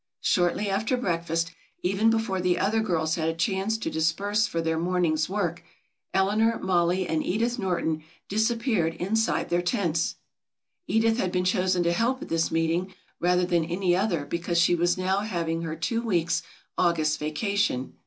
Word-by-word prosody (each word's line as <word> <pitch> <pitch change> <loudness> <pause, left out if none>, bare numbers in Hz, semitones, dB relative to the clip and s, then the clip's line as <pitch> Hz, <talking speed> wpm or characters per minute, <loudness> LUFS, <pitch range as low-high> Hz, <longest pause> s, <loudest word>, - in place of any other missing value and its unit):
Shortly 180 +3 +1
after 220 +6 0
breakfast, 165 -6 -1 0.3
even 195 +5 +2
before 225 -4 0
the 180 -1 +2
other 220 +3 +1
girls 165 -7 0
had 160 -1 0
a 165 - -2
chance 195 +5 0
to 225 - -4
disperse 200 +7 +1
for 165 - -3
their 160 0 0
morning's 170 -3 +1
work, 175 -4 -2 0.5
Eleanor, 215 +4 +2
Mollie 180 0 +1
and 160 -1 0
Edith 235 +6 0
Norton 170 -5 -1 0.3
disappeared 220 -5 +1
inside 220 +5 0
their 175 0 +2
tents. 175 -4 0 0.7
Edith 225 +1 +2
had 185 - 0
been 180 0 0
chosen 185 -2 +2
to 170 0 +2
help 240 +8 +1
at - - -10
this 165 0 +1
meeting 165 +3 0 0.2
rather 180 +1 +2
than 175 -2 +1
any 175 +1 +1
other 180 -6 0
because 170 +2 -2
she 170 +1 +4
was 175 +1 +2
now 190 +1 +1
having 170 -6 -2
her 160 -1 -4
two 165 +9 -1
weeks' 170 -6 0 0.4
August 160 -3 +2
vacation. 155 - -1
180 Hz, 165 wpm, -26 LUFS, 165-205 Hz, 0.7 s, she